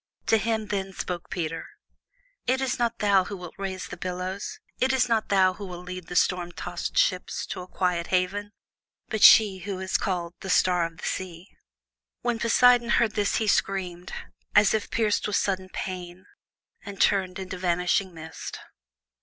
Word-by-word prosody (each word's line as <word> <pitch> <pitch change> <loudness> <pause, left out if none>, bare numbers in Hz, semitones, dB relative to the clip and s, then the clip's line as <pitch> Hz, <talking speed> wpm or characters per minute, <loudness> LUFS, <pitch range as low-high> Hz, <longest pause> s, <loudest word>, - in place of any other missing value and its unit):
To 225 - +4
him 220 +1 -1
then 195 -1 -2
spoke 180 -2 -5
Peter: 165 -2 -3 0.8
"It 260 +2 +2
is 265 -2 -1
not 235 -1 0
thou 200 -3 +3
who 200 - -6
wilt 180 -2 -9
rouse 190 -1 -4
the - - -8
billows. 185 +2 -4 0.2
It 260 +1 +2
is 260 -1 +3
not 225 -2 +1
thou 190 -2 +4
who 200 +1 -8
wilt 180 0 -8
lead 180 -1 -7
the 175 - -7
storm 175 -1 +2
tossed - - -5
ships - - +1
to - - -4
a 180 - -9
quiet 180 -2 -1
haven, 195 +3 0 0.6
but 220 -2 -2
she 205 -4 +8
who 190 +1 -5
is 190 0 0
called 175 -3 -2
the 190 - -7
'Star 180 -2 +3
of 165 -1 -16
the - - -7
Sea.'" 180 0 -4 0.7
When 240 -2 -1
Poseidon 240 +1 +5
heard 235 -2 +3
this 205 -2 0
he 220 - +1
screamed, 185 -3 0 0.4
as 205 0 +6
if 215 -1 -1
pierced 215 -2 +1
with 210 - -1
sudden 190 -1 0
pain, 185 -1 -6 0.6
and 200 -2 -8
turned 190 -2 +2
into 185 -1 -6
vanishing 180 +1 +1
mist. 160 -1 -8
190 Hz, 175 wpm, -26 LUFS, 180-210 Hz, 0.8 s, she